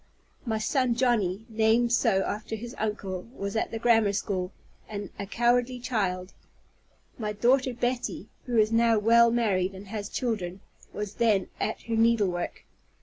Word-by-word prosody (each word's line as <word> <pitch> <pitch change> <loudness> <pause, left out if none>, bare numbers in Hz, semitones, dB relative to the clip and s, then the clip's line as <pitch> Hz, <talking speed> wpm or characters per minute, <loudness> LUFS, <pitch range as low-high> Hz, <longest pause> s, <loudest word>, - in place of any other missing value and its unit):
My 220 -1 0
son 250 +2 +1
Johnny, 225 -5 +1
named 225 +1 +2
so 215 -6 +3
after 215 +1 -4
his 235 +3 -7
uncle, 200 -3 -3
was 200 +1 -4
at 220 - 0
the 225 - -4
grammar 225 -3 +3
school, 185 -2 -2 0.4
and 205 -2 -6
a 200 - -4
cowardly 240 +3 +2
child. 195 -7 -2 0.9
My 210 -2 -2
daughter 255 +5 +3
Betty 245 +1 -2 0.2
(who 240 -2 0
is 215 0 +4
now 230 0 +4
well 230 +2 +5
married, 195 -5 +1
and 190 +1 -10
has 210 -1 -4
children) 195 -7 -3 0.3
was 210 -1 -5
then 210 -5 +3
at 215 - -2
her 230 - -2
needlework. 215 -6 +1
220 Hz, 150 wpm, -27 LUFS, 200-235 Hz, 0.9 s, well